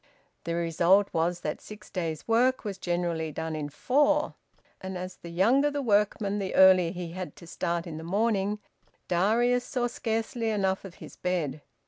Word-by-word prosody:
The 170 +1 -1
result 170 +4 +3
was 170 +1 0
that 150 - -3
six 210 0 -12
days' 165 -4 -3
work 250 +3 +3
was 195 -2 -4
generally 175 -3 -1
done 160 +1 -4
in 150 -1 -4
four. 290 - +2 0.5
And 190 0 -5
as 185 +1 -6
the 170 - -10
younger 235 +12 +3
the 290 -1 -3
workman 205 -2 +1
the 195 -1 -3
earlier 185 -2 +7
he 175 -2 -6
had 185 +1 -6
to 170 - -13
start 170 0 -2
in 160 -3 -6
the 160 - -7
morning, 205 +2 +1 0.5
Darius 230 +8 +2
saw 245 -1 -1
scarcely 230 0 -2
enough 195 -2 0
of 185 -2 -10
his - - -12
bed. 160 -6 -2
190 Hz, 170 wpm, -28 LUFS, 170-220 Hz, 0.5 s, earlier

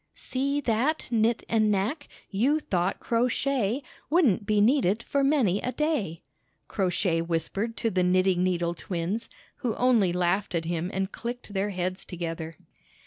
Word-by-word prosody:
"See 280 +2 -1
that, 255 +6 0
Knit 230 0 +2
and 215 -2 +2
Ivnack! 220 - -1 0.2
You 250 +10 +2
thought 185 - -1
Crow 235 +1 +1
Shay 255 -1 0 0.3
Wouldn't 265 - +3
be 210 -1 +3
needed 225 -2 +3
For 280 -1 0
many 260 -10 +2
a 250 - -2
day!" 260 - -1 0.4
Crow 190 -3 0
Shay 175 -2 +1
whispered 170 +7 -2
to 225 - 0
the 185 - +1
knitting 185 0 +3
needle 175 -2 0
twins, 180 +5 -3 0.3
who 235 -3 -2
only 235 -7 +3
laughed 180 +2 0
at 165 -1 -1
him 170 +1 -2
and 190 +1 -2
chcked 240 +1 -6
their 200 0 -1
heads 185 -1 -3
together. 165 -2 -5
205 Hz, 155 wpm, -27 LUFS, 180-245 Hz, 0.4 s, Wouldn't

